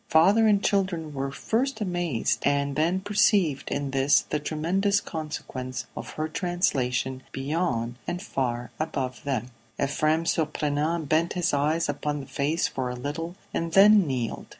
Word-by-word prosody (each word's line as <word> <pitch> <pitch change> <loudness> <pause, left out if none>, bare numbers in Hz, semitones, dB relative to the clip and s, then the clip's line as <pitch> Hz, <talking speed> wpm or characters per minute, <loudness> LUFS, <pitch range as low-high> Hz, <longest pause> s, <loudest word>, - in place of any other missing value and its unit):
Father 195 +8 +5
and 205 -2 +3
children 185 -7 0
were 135 0 -2
at 135 - -7
first 255 +2 -1
amazed, 175 - 0
and 140 0 +1
then 170 +5 +1
perceived 200 -7 +2
in 140 -1 -2
this 135 +1 +4
the 150 - -3
tremendous 185 +7 +1
consequence 150 -7 -5
of - - -7
her 155 0 -2
translation 130 -8 -1
beyond 135 -5 -2
and 175 - -2
far 120 - -3
above 135 -6 -3
them. 125 -3 -2 0.3
Ephrem. 155 +3 +1
Surprenant 155 0 0
bent 160 +3 +2
his 180 -3 0
eyes 150 +4 +1
upon 145 0 -2
the 135 - -7
face 150 +6 0
for 130 -2 -3
a 125 - -4
little, 150 +7 -4 0.2
and 165 0 -2
then 200 -1 +7
kneeled. 125 -4 -3
155 Hz, 150 wpm, -26 LUFS, 135-175 Hz, 0.3 s, then